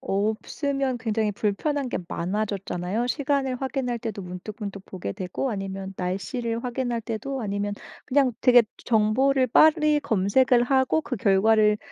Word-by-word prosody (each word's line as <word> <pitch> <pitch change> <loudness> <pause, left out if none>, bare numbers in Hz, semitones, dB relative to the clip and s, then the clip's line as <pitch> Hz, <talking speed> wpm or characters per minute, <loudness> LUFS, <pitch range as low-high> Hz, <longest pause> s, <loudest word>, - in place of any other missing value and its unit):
없으면 255 +6 -1
굉장히 220 -2 -1
불편한 255 +8 -1
게 - - -2
많아졌잖아요. 195 +3 -2
시간을 275 -2 -1
확인할 260 -3 -2
때도 215 -3 -5
문득문득 195 +2 -7
보게 185 -2 -6
되고 190 +7 -3
아니면 195 -2 -5
날씨를 230 +6 -3
확인할 245 -1 -2
때도 245 +4 -4
아니면 205 0 -2 0.3
그냥 265 -1 +2
되게 245 -2 +7 0.2
저 235 - +2
정보를 260 +4 +2
빨리 305 +2 +5
검색을 240 0 +3
하고 265 +4 +2
그 275 -5 -4
결과를 210 +1 +3
230 Hz, 325 characters per minute, -25 LUFS, 200-260 Hz, 0.3 s, 되게